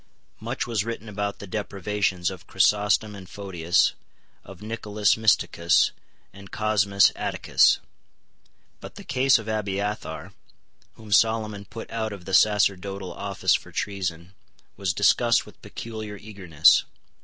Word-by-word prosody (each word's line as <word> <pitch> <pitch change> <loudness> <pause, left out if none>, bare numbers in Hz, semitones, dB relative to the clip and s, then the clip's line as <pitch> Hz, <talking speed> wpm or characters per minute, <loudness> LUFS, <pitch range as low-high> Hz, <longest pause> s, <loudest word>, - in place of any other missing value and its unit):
Much 120 +4 -3
was 115 -4 -1
written 115 0 -6
about 100 -1 -3
the - - -9
deprivations 100 -2 -2
of 90 -2 -11
Chrysostom 105 +3 +2
and 95 -3 -11
Photius, 90 -4 +1 0.5
of 95 -2 -13
Nicolaus 105 -2 0
Mysticus 95 -6 +2 0.4
and 100 0 -13
Cosmas 100 -2 +3
Atticus. - - +2 1.0
But - - -11
the - - -10
case 130 +1 +3
of 110 -1 -8
Abiathar, 100 -5 -3 0.6
whom 110 -2 -13
Solomon 110 -1 +2
put 115 +2 -9
out 110 -2 -3
of 95 -3 -11
the 95 - -6
sacerdotal 100 -2 +2
office - - 0
for - - -2
treason, 90 -3 -4 0.4
was 95 -2 -1
discussed 115 +5 +3
with - - -17
peculiar 110 -2 -7
eagerness. 95 -8 +3
100 Hz, 125 wpm, -25 LUFS, 95-110 Hz, 1.0 s, Cosmas